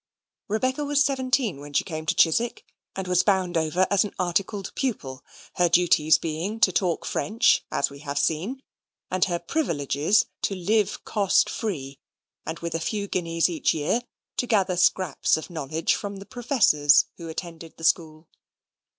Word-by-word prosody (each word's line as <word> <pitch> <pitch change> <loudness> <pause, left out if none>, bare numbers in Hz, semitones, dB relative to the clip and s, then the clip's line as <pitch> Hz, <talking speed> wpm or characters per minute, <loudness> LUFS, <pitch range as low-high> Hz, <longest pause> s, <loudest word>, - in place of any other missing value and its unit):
Rebecca 255 +7 -1
was 290 0 +2
seventeen 255 - 0
when 145 0 -10
she - - +2
came 155 -3 -6
to - - +1
Chiswick, 230 +9 +2 0.3
and 190 -1 -4
was 180 0 +3
bound 185 -3 +1
over 165 +3 +2
as 200 0 +4
an 210 - -7
articled 190 +3 -1
pupil; 145 - -3 0.3
her 175 -1 +3
duties 165 -3 +4
being 170 +7 -4
to 190 - +5
talk 175 -2 0
French, 220 +3 +2
as 140 - 0
we 140 - -11
have 140 -1 -5
seen; 190 - -1 0.5
and 185 -1 +2
her 175 -2 -1
privileges 170 - +1 0.2
to 195 - -1
live 205 +3 0
cost 200 -3 +2
free, 140 -10 -4 0.5
and, 160 - -4
with 170 -1 -4
a 165 - -1
few 205 +4 -3
guineas 165 -3 0
a 170 -3 -5 0.2
year, 155 +11 0 0.4
to 245 - 0
gather 195 -5 +2
scraps 175 -3 +2
of 160 - -8
knowledge 155 0 -1
from 200 -1 -4
the 195 - -10
professors 200 - +3
who 170 -2 -8
attended 165 0 -8
the 165 - -12
school. 160 -1 0
180 Hz, 165 wpm, -25 LUFS, 160-205 Hz, 0.5 s, to